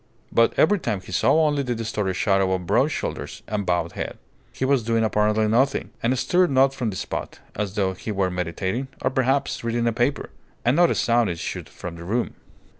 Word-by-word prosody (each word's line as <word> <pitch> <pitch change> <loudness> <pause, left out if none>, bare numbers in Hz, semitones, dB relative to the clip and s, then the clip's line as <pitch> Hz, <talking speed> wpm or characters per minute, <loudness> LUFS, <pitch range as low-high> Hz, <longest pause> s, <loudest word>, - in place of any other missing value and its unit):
But 115 0 +3
every 205 +5 +4
time 110 - -2
he 95 - -12
saw 155 - +3
only 145 -2 +1
the 125 -3 -2
distorted 105 -4 -2
shadow 95 -1 +2
of 90 -1 -2
broad 120 +9 +3
shoulders 155 - -5
and 105 -2 -3
bowed 85 -2 0
head. - - -5 0.3
He 130 - -2
was 135 -1 +3
doing 115 0 +1
apparently 105 0 +2
nothing, 130 +6 +1
and 125 +3 +1
stirred 180 +7 +3
not 135 0 +4
from 125 -4 -2
the 100 - -5
spot, - - -5 0.2
as 100 -2 -3
though 95 -2 +1
he 100 +4 -6
were 95 -2 0
meditating 95 +8 -2 0.2
or, - - +2
perhaps, 135 +1 0
reading 115 0 0
a 115 - +2
paper. 120 +5 -1 0.3
And 120 +3 +4
not 175 +1 +5
a - - +1
sound 120 -2 +2
issued 85 -1 -5
from 85 -1 -8
the 85 - -9
room. 115 +7 -1
115 Hz, 205 wpm, -24 LUFS, 95-130 Hz, 0.3 s, not